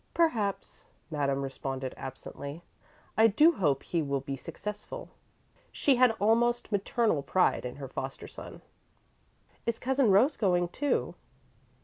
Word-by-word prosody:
"Perhaps," 225 - 0 0.3
Madame 140 -2 0
responded, 135 -1 -4
absently. 140 +4 -7 0.5
"I 220 +1 +6
do 300 +11 +6
hope 150 - 0
he 170 - -1
will 140 -2 -1
be 140 0 -4
successful." 210 +9 -7 0.6
She 275 -3 +3
had 255 0 +6
almost 235 +3 +2
maternal 205 -4 +1
pride 180 -2 +2
in 125 - -5
her 140 -1 -7
foster 135 +1 -6
son. - - -10 1.0
"Is 230 -1 +1
Cousin 265 -1 +2
Rose 235 +10 +4
going, 175 -4 +2
too?" 290 +9 -1
190 Hz, 125 wpm, -29 LUFS, -, 1.0 s, I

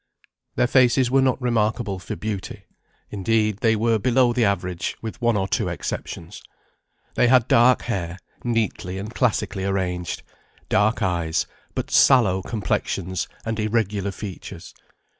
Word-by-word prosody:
Their - - +3
faces 125 0 +3
were 135 0 +4
not 130 -1 +2
remarkable 110 -4 0
for 90 - -6
beauty; 105 -3 -5 0.5
indeed, 105 +1 +1
they 110 +1 +2
were 110 +1 +2
below 125 +1 +3
the 120 -1 +2
average, 90 -4 -1
with 110 +1 -7
one 120 -2 +2
or 95 -1 0
two - - 0
exceptions; - - -6 0.7
they - - +3
had 125 -2 +4
dark 120 +2 +5
hair, 90 -6 -3 0.3
neatly 110 -6 -1
and 105 +4 -6
classically 110 -6 0
arranged, 90 -3 -2 0.5
dark 110 +4 +2
eyes, 85 -3 0 0.3
but - - -3
sallow 105 -9 +5
complexions 95 -4 -2 0.2
and 115 -1 -2
irregular 105 -2 0
features. 95 -3 -8
110 Hz, 135 wpm, -23 LUFS, 95-120 Hz, 0.7 s, dark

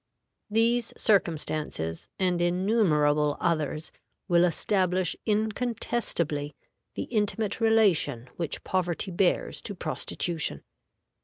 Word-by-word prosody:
These 230 +2 +2
circumstances, 155 - 0
and 180 -2 +1
innumerable 170 -6 +2
others, 155 -2 -1 0.4
will 175 -2 +4
establish 185 0 +1
incontestably 215 -8 -1 0.4
the - - -2
intimate 215 0 -1
relation 205 - +3
which 170 -4 -4
poverty 185 0 -1
bears 180 +1 +1
to 200 - -5
prostitution. 165 0 -2
180 Hz, 85 wpm, -27 LUFS, 155-215 Hz, 0.4 s, will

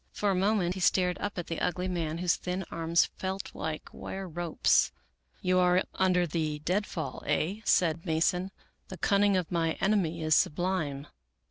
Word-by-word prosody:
For 205 -1 0
a - - +1
moment 190 -2 +1
he 190 - -6
stared 180 0 +2
up 205 -1 -4
at 175 - -3
the 165 - -4
ugly 180 +1 -1
man 165 -3 -2
whose 180 0 +2
thin 180 +1 -4
arms 165 0 +2
felt 190 +1 -4
like 155 0 -4
wire 190 0 -6
ropes. 170 -1 +2 0.2
" - - -37
You 185 0 +3
are 180 +1 +4
under 180 -2 +2
the 155 -2 -2
dead 185 +7 -1
fall, 155 -6 -5
aye," 165 +8 0
said 165 -2 +2
Mason. 180 +2 +1 0.2
" - - -43
The 185 - -7
cunning 200 +2 +3
of 180 -3 -2
my 165 -2 +1
enemy 180 -5 0
is 155 0 +3
sublime." 155 -4 0
180 Hz, 180 wpm, -29 LUFS, 160-190 Hz, 0.2 s, are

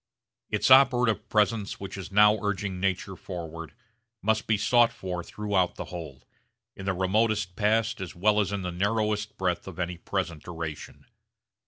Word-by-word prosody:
Its - - +1
operative 125 -4 +5
presence 105 -1 +1
which 100 - -7
is 95 -1 -7
now 105 +1 +5
urging 100 -2 -2
nature 95 0 -1
forward 85 -3 -7 0.5
must 110 +1 +1
be 110 - +3
sought 115 +3 +4
for 90 -2 -5
throughout 100 -3 -1
the - - -6
whole, 80 -7 -8 0.5
in 95 - -8
the 95 - +2
remotest 100 0 +1
past 110 +2 +1
as 95 - -6
well 105 +4 +3
as 100 -2 0
in 100 -2 -3
the 90 - -3
narrowest 105 +3 -1
breadth 90 -2 -1
of 95 - -8
any 90 -1 -3
present 85 -5 -3
duration. 80 -3 -7
100 Hz, 160 wpm, -27 LUFS, 90-105 Hz, 0.5 s, operative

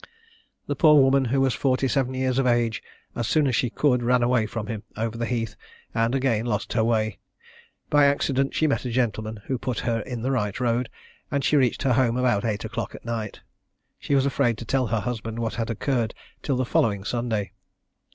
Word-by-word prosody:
The - - -2
poor 150 -3 +6
woman, 135 0 +4
who 130 +3 +1
was 135 -2 +2
forty 135 0 +1
seven 130 -1 0
years 130 0 0
of 135 - +2
age, 120 -4 +1 0.3
as 120 -2 -2
soon 155 -2 +3
as 130 -4 +1
she 125 - +1
could, 125 0 +2
ran 125 0 +2
away 120 -2 +2
from 110 -1 -4
him, 110 -1 -5 0.2
over 115 +1 -2
the 115 0 -2
heath, 115 -4 -2 0.4
and 115 +3 +1
again 120 -4 +1
lost 105 -3 -2
her 115 - +2
way; 110 -2 0 0.7
by 145 -1 +6
accident 135 -1 +1
she 155 - +2
met 145 - +1
a 125 - -3
gentleman, 110 -3 -2
who 130 -2 -2
put 125 -3 -3
her 115 -1 0
in 115 +1 -5
the 130 - 0
right 105 -6 -1
road, 120 -1 0 0.4
and 140 -1 -1
she 150 - +2
reached 130 -4 +2
her 135 -3 +3
home 120 -1 +2
about 120 -5 +2
eight 105 -3 -2
o'clock - - -4
at - - -12
night. 115 -3 -4 0.6
She 140 - 0
was 135 -1 +3
afraid 130 -4 +1
to 115 - -7
tell 130 +2 +1
her 110 -1 0
husband 115 0 -4
what 115 -1 -2
had 115 -1 -3
occurred 115 0 -1 0.3
till 135 -3 -1
the 130 - 0
following 100 -4 +1
Sunday. 110 -4 -2
120 Hz, 210 wpm, -25 LUFS, 115-130 Hz, 0.7 s, poor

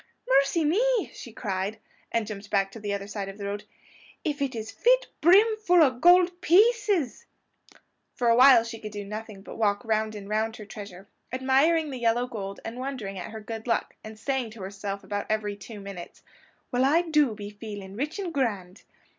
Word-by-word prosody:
"Mercy 275 +5 +3
me!" 465 +9 +2
she - - -10
cried, 195 0 -3 0.3
and 230 -2 0
jumped 205 -1 -8
back 195 -1 +1
to 225 - -9
the 205 -1 -4
other 200 0 -3
side 200 -1 -5
of 195 - -9
the 200 - -6
road; 205 +1 -4 0.6
"if 295 -4 -2
it 270 -3 -1
is 220 -1 -5
fit - - +3 0.2
brim 375 +7 +7
full 360 -6 +5
o' 275 - +4
gold 355 +6 +4
PIECES!!" 405 - +3 0.9
For 245 - 0
a 230 - +6
while 250 -2 +8
she 230 -1 -7
could 215 -1 -7
do 205 -1 -5
nothing 210 -1 -7
but - - -10
walk 205 +2 +1
round 220 -1 0
and 200 -1 -8
round 220 +1 -1
her 210 - -9
treasure, 200 -3 -10 0.2
admiring 275 +5 +2
the 260 - -5
yellow 235 +1 +2
gold 200 -5 -6
and 230 +2 -6
wondering 250 -8 -5
at - - -6
her 220 - -7
good 225 +2 -7
luck, 230 - 0
and 215 0 -9
saying 260 0 -2
to 215 -3 -10
herself 200 +1 -5
about 205 0 -4
every 215 -1 -1
two 205 +2 -10
minutes, 195 -3 -9 0.5
"Well, 250 +1 +2
I 310 +6 +4
do 300 -8 +2
be 205 -1 -7
feeling 205 -2 -8
rich 295 - -3
and 370 -4 -4
grand!" 205 -9 -2
225 Hz, 195 wpm, -27 LUFS, 205-275 Hz, 0.9 s, while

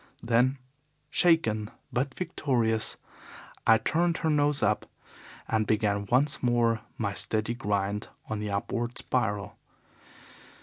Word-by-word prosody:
Then, 120 +3 +3 0.5
shaken 110 -12 +3 0.2
but 130 +2 -1
victorious, 120 -10 0 0.7
I 115 - +8
turned 170 +8 +1
her 160 -1 0
nose 145 -2 +2
up 105 +1 +1 0.6
and 110 -1 +1
began 100 -2 +1
once 140 +3 +2
more 120 -2 +2 0.2
my 100 -3 -1
steady 110 +3 -1
grind 105 -2 -1 0.2
on 110 - -3
the 105 0 -3
upward 115 +4 -2
spiral. 105 -6 -2
115 Hz, 115 wpm, -28 LUFS, 105-130 Hz, 0.7 s, I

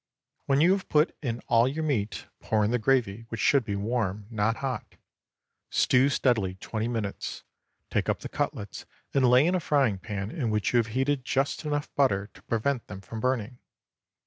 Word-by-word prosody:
When 140 +1 +3
you 175 +3 +6
have 195 -1 -1
put 150 +2 +3
in 120 -4 -3
all 115 +1 +4
your 150 +4 -2
meat, 110 -9 -1
pour 105 -1 +1
in 105 - 0
the 125 - +1
gravy, 115 -2 +1
which 115 - -5
should 140 +2 +4
be 100 -3 -3
warm—not 105 0 -1
hot. 130 -3 -4 0.7
Stew 130 +2 +4
steadily 110 -9 +1
twenty 110 +4 -3
minutes, 110 -4 -4 0.5
take - - 0
up - - 0
the - - -5
cutlets 100 - -4 0.3
and 130 -3 +4
lay 125 +4 +6
in 175 - +2
a 185 - +2
frying 135 - +2
pan 100 0 -4
in 140 -9 -2
which 105 +1 0
you - - +5
have 115 -2 +2
heated 135 0 +1
just 135 +5 -1
enough 145 -1 -2
butter 105 -8 +1
to - - -17
prevent 120 +2 -1
them 95 -1 -8
from 110 +4 -7
burning. 125 0 -1
120 Hz, 185 wpm, -27 LUFS, 105-135 Hz, 0.7 s, you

